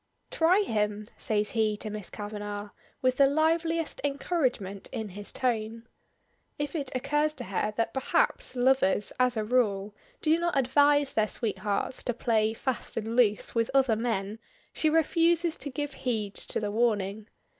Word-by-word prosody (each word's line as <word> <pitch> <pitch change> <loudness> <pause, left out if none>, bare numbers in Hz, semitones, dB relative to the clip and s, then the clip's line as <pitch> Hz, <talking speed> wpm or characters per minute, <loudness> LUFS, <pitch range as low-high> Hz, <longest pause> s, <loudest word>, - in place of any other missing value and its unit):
"Try 350 +5 +4
him!" 210 - -1
says 210 -2 -1
he 215 -2 +1
to 215 0 -5
Miss 210 -3 -6
Kavanagh, 205 -1 -6 0.3
with 255 0 +2
the 275 - +6
liveliest 325 +2 +1
encouragement 270 - -1
in 220 -2 -4
his 205 +2 -8
tone. 230 -2 -2 0.7
If 290 +2 -3
it 280 -4 -2
occurs 295 +4 0
to - - -6
her 200 +2 -1
that, 225 0 0
perhaps, 270 - +1
lovers, 250 -5 +2
as 250 -2 +2
a 215 - 0
rule, 210 -4 +1 0.3
do 320 +1 +3
not 345 -3 0
advise 285 +2 +3
their 215 -1 +2
sweethearts 205 +1 -2
to 245 - -1
play 220 -2 +1
fast 260 +1 -3
and 225 +1 -2
loose 215 -4 +2
with 230 -1 +1
other 265 -4 +4
men, 215 -2 -2 0.3
she 315 - +2
refuses 330 +1 +3
to 285 - -4
give 290 +1 -4
heed 220 -7 -2
to - - -1
the 210 -1 -2
warning. 210 -2 0
235 Hz, 155 wpm, -28 LUFS, 210-285 Hz, 0.7 s, the